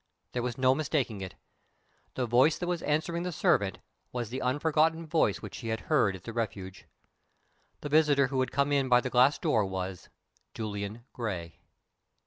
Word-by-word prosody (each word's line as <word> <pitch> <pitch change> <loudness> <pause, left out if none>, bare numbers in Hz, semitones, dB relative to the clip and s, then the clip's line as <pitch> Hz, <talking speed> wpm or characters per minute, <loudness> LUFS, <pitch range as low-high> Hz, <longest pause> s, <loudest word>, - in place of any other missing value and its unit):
there 125 - -2
was 120 -1 -3
no 130 0 +4
mistaking 135 -8 -1
it. 95 -2 -7 0.8
The 130 - 0
voice 125 +7 +4
that 175 - -3
was 175 -2 -2
answering 160 +3 -1
the 180 +1 -3
servant 100 - +1 0.3
was 120 -3 -4
the 130 - -3
unforgotten 155 +5 +1
voice 155 - +1
which - - -7
she 115 - -7
had 110 0 -2
heard 125 -11 +2
at 90 - -12
the 115 - -7
Refuge. 95 -5 -5 0.9
The 145 - -5
visitor 145 -3 +4
who 135 -1 -1
had 130 - +1
come 140 +2 +1
in 140 -2 +2
by 125 0 +6
the 130 - -4
glass 130 +3 +5
door 110 - +2
was 95 -1 -5 0.5
Julian 105 +1 -5
Gray! 90 -9 -5
125 Hz, 175 wpm, -29 LUFS, 105-150 Hz, 0.9 s, by